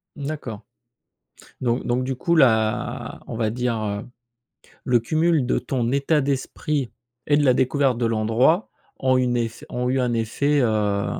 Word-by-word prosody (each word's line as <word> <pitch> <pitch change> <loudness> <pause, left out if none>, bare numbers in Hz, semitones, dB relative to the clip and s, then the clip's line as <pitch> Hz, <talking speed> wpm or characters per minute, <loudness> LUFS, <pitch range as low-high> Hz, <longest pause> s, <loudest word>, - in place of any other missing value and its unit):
Mmh, 145 - -6
d'accord. 130 -9 -5 1.0
Donc 120 -1 0
donc 125 +1 0
du 130 0 -3
coup 170 +6 0
la 110 -7 +1
on - - -6
va 110 -1 0
dire, 120 0 -1
heu, 100 0 -3 0.8
le 125 -2 +3
cumul 155 +3 +1
de - - +1
ton 120 -3 -2
état 140 +2 +2
d'esprit 140 0 -2 0.4
et 145 - +4
de 150 - +2
la 130 - +5
découverte 130 0 +1
de 120 - 0
l'endroit 115 - +2 0.3
ont 130 -1 +2
une 125 -1 +1
ef 115 -1 -3
ont 125 0 -2
eu 130 +1 +1
un 125 -2 0
effet, 140 +6 +1
heu, 105 -4 +1
125 Hz, 165 wpm, -23 LUFS, 115-140 Hz, 1.0 s, la